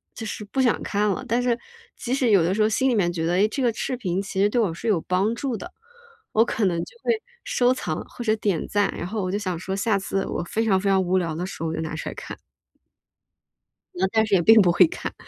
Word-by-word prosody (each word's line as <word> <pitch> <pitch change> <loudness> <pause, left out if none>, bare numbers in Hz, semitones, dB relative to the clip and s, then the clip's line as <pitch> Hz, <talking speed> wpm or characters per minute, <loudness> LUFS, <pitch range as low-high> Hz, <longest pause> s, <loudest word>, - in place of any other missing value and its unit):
就 225 - -6
是 215 -1 -5
不 265 +6 -1
想 245 -3 +2
看 210 0 0
了， 190 - -2
但 240 +2 +1
是 240 -1 +1 0.4
即 250 0 -3
使 255 -5 +2
有 195 -4 +6
的 180 +3 +1
时 215 - 0
候 215 - +3
心 260 +4 +2
里 240 - +2
面 175 -4 +2
觉 165 -2 -2
得： 170 - 0
“哎， 200 +3 +4
这 275 - -3
个 235 -2 +2
视 255 +3 -3
频 190 -5 -1
其 195 0 -3
实 205 - +4
对 240 - +1
我 190 -7 0
是 225 +7 -6
有 185 -7 +2
帮 195 +5 0
助 250 -3 -3
的，” - - -9 0.6
我 225 +2 +4
可 225 - -2
能 170 -2 +1
就 475 - -16
会 - - +2 0.3
收 255 - +2
藏 160 -11 -3
或 240 - -8
者 215 - +3
点 200 -6 -1
赞， 205 -1 +1
然 - - -4
后 215 +1 -3
我 185 - -2
就 200 - 0
想 185 -4 -3
说， 190 +1 -4
下 200 0 +1
次 195 0 -2
我 - - -3
非 225 +6 -1
常 190 -3 +3
非 200 - 0
常 190 -1 +4
无 185 +1 +1
聊 165 -3 -1
的 175 +2 -3
时 190 - -8
候， - - -1
我 160 - -3
就 160 - -3
拿 160 0 -4
出 - - -6
来 - - -8
看。 - - -8 1.6
那 190 +2 +1
但 220 -1 +3
是 205 -2 +2
也 175 - +4
并 220 +4 +7
不 175 -3 +4
会 175 +1 +6
看， - - -6
200 Hz, 300 characters per minute, -24 LUFS, 180-225 Hz, 1.6 s, 并